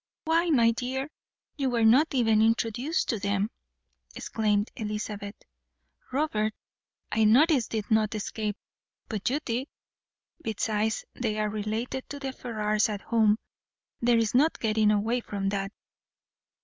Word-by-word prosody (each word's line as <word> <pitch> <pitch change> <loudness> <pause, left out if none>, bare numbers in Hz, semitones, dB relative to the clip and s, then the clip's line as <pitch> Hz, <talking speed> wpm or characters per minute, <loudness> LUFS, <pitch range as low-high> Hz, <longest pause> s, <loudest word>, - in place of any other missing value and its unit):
"Why, 330 +2 +2
my 235 -7 +5
dear, 260 +4 -3 0.5
you 275 -2 0
were 235 -2 +2
not 270 +7 +5
even 225 -4 +4
introduced 230 - +1
to 225 - 0
them," 200 +2 0 0.6
exclaimed 210 -1 0
Elizabeth. 210 -1 -4 0.8
"Robert, 220 -7 0 0.6
I 220 - +2
noticed, 255 +3 +4
did 220 -2 -4
not 220 0 +2
escape, 210 0 -3 0.5
but 215 -2 -1
you 280 +4 0
did. 245 +3 -2 0.7
Besides, 220 -1 -1
they 220 -3 -2
are 215 0 0
related 215 +5 -3
to 285 - -5
the 270 -1 -4
Ferrars 215 -3 0
at 205 -2 -4
home; 220 -2 +3 0.6
there 240 0 +4
is 225 -2 +1
no 275 +5 +6
getting 215 -1 +2
away 215 +4 +2
from 200 -3 -3
that." 195 0 -2
220 Hz, 135 wpm, -27 LUFS, 210-250 Hz, 0.8 s, no